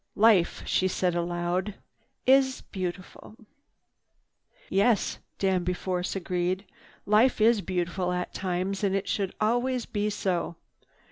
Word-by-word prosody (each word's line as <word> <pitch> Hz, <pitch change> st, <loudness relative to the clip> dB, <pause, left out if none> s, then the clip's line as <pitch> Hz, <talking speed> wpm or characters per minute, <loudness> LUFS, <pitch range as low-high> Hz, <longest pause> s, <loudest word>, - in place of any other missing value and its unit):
"Life," 205 Hz, -5 st, +4 dB
she 185 Hz, -, +2 dB
said 180 Hz, -1 st, 0 dB
aloud, 175 Hz, +3 st, -1 dB, 0.5 s
"is 265 Hz, 0 st, +4 dB
beautiful." 185 Hz, +2 st, -6 dB, 1.3 s
"Yes," 205 Hz, +2 st, +2 dB, 0.2 s
Danby 185 Hz, -2 st, +1 dB
Force 180 Hz, 0 st, -3 dB
agreed, 185 Hz, +1 st, -1 dB, 0.4 s
"life 220 Hz, +5 st, +4 dB
is 220 Hz, 0 st, +4 dB
beautiful 180 Hz, -1 st, -2 dB
at 180 Hz, 0 st, -3 dB
times, 190 Hz, +2 st, -2 dB
and 195 Hz, -1 st, +2 dB
should 195 Hz, -2 st, -1 dB
always 245 Hz, +3 st, +1 dB
be 210 Hz, 0 st, -1 dB
so. 185 Hz, -4 st, -2 dB
190 Hz, 110 wpm, -27 LUFS, 180-210 Hz, 1.3 s, Life